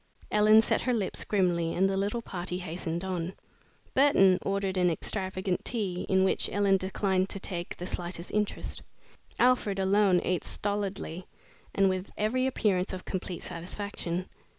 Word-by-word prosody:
Ellen 215 +1 +6
set - - +1
her 250 -1 +1
lips 205 -4 -1
grimly 175 -5 +1
and 190 +2 +3
the 195 - 0
little 205 +4 -1
party 180 -2 -4
hastened 170 -1 -4
on. 185 -1 -3 0.6
Burton 195 -10 +5
ordered 195 -1 -1
an 180 -1 +3
extravagant 185 +1 -2
tea, 195 -7 -2
in 190 0 +4
which 190 - +1
Ellen 200 -1 +3
declined 190 0 0
to 195 - -2
take 175 -3 -4
the 175 - -5
slightest 175 -1 -4
interest. 210 -1 -2 0.6
Alfred 245 -5 +3
alone 195 -1 +4
ate 180 -1 0
stolidly 200 -4 -3 0.5
and 195 -1 +4
with 185 0 -1
every 255 +5 +1
appearance 195 -8 0
of 185 - -6
complete 185 -2 -4
satisfaction. 180 0 -4
190 Hz, 150 wpm, -29 LUFS, 180-205 Hz, 0.6 s, Ellen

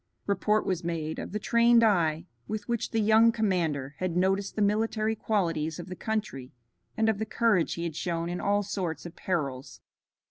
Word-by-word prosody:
Report 210 +1 +1
was 185 -2 -1
made 160 -2 -3
of - - -6
the 210 - -2
trained 235 +2 +4
eye 170 -6 +2 0.2
with 210 -1 -4
which 235 -2 -1
the 225 - 0
young 220 +2 +5
commander 170 - -1
had 185 -2 -1
noticed 195 +2 +1
the 215 - -1
military 215 +1 +1
qualities 165 -8 -1
of 175 +1 -8
the 185 - -5
country 190 - -4 0.5
and 220 0 +2
of 220 -2 +1
the - - 0
courage 215 -7 +2
he 170 - -4
had 165 -3 -4
shown 170 0 -2
in 175 +1 -3
all 205 0 +1
sorts 185 -5 -4
of 170 0 -8
perils. 140 -8 -3
190 Hz, 185 wpm, -28 LUFS, 165-215 Hz, 0.5 s, young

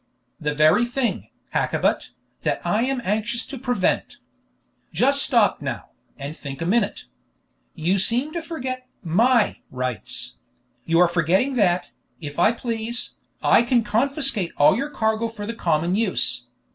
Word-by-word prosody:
"The 150 -2 -2
very 155 +9 +5
thing, 245 0 -2 0.2
Hakkabut, - - 0 0.3
that - - -2
I 215 - +1
am 260 -2 -2
anxious 220 +4 -1
to 275 - -8
prevent. 245 -7 -1 0.7
Just 280 +2 +5
stop 235 - +3
now, 140 -4 -5 0.3
and 140 +2 -6
think 140 -4 -8
a 165 - -3
minute. 205 +3 0 0.7
You 180 +5 +1
seem 250 +10 +1
to 340 - -3
forget 255 -6 -5 0.2
my 225 +7 +2
rights; 125 - -4 0.5
you 165 0 +2
are 180 +1 +6
forgetting 175 - +1
that, 180 -7 +1 0.3
if 145 -1 -7
I 210 - +5
please, 235 0 -4 0.3
I - - +6
can 240 0 +2
confiscate 270 - 0
all 145 - +6
your 275 +5 -2
cargo 220 -4 0
for 220 -2 -7
the 230 - -4
common 170 -3 0
use. 180 - -1
220 Hz, 145 wpm, -23 LUFS, 170-245 Hz, 0.7 s, are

